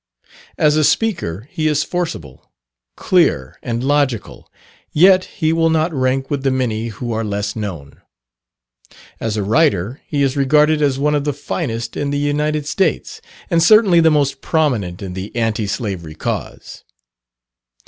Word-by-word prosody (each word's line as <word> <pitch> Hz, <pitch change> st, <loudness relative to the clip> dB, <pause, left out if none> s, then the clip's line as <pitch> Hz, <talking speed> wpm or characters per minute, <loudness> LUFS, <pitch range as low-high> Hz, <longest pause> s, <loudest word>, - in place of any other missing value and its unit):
As 150 Hz, 0 st, +3 dB
a 155 Hz, -, +3 dB
speaker, 140 Hz, -, 0 dB
he 155 Hz, -1 st, -1 dB
is 150 Hz, -1 st, +1 dB
forcible, 160 Hz, -, -5 dB, 0.5 s
clear, 150 Hz, -, +1 dB
and 120 Hz, +1 st, -3 dB
logical, 140 Hz, -5 st, -1 dB, 0.4 s
yet 185 Hz, +3 st, +5 dB
he 160 Hz, -5 st, -1 dB
will 165 Hz, 0 st, +2 dB
not 160 Hz, +1 st, +1 dB
rank 135 Hz, 0 st, 0 dB
with 140 Hz, -2 st, -1 dB
the 135 Hz, -, +1 dB
many 120 Hz, -4 st, -1 dB
who 115 Hz, +2 st, -6 dB
are 115 Hz, 0 st, -1 dB
less 100 Hz, -1 st, -3 dB
known. 90 Hz, -10 st, -7 dB, 1.2 s
As 110 Hz, -1 st, -2 dB
a 105 Hz, -, -1 dB
writer, 115 Hz, -, +1 dB
he 145 Hz, -2 st, 0 dB
is 135 Hz, -1 st, 0 dB
regarded 150 Hz, +2 st, +3 dB
as 140 Hz, -3 st, +1 dB
one 150 Hz, +2 st, +1 dB
of 145 Hz, -1 st, 0 dB
the 145 Hz, 0 st, -1 dB
finest 120 Hz, -5 st, -4 dB
in 145 Hz, -, -2 dB
the 145 Hz, -, -1 dB
United 150 Hz, +1 st, -1 dB
States, 165 Hz, +3 st, -1 dB, 0.3 s
and 165 Hz, -, +3 dB
certainly 195 Hz, -1 st, +6 dB
the 160 Hz, -1 st, +5 dB
most 140 Hz, -3 st, 0 dB
prominent 115 Hz, -, -1 dB
in 95 Hz, -2 st, -6 dB
the 95 Hz, +4 st, -7 dB
Anti 115 Hz, -2 st, -1 dB
Slavery 95 Hz, -, -4 dB
cause. -, -, -5 dB
140 Hz, 155 wpm, -18 LUFS, 110-155 Hz, 1.2 s, certainly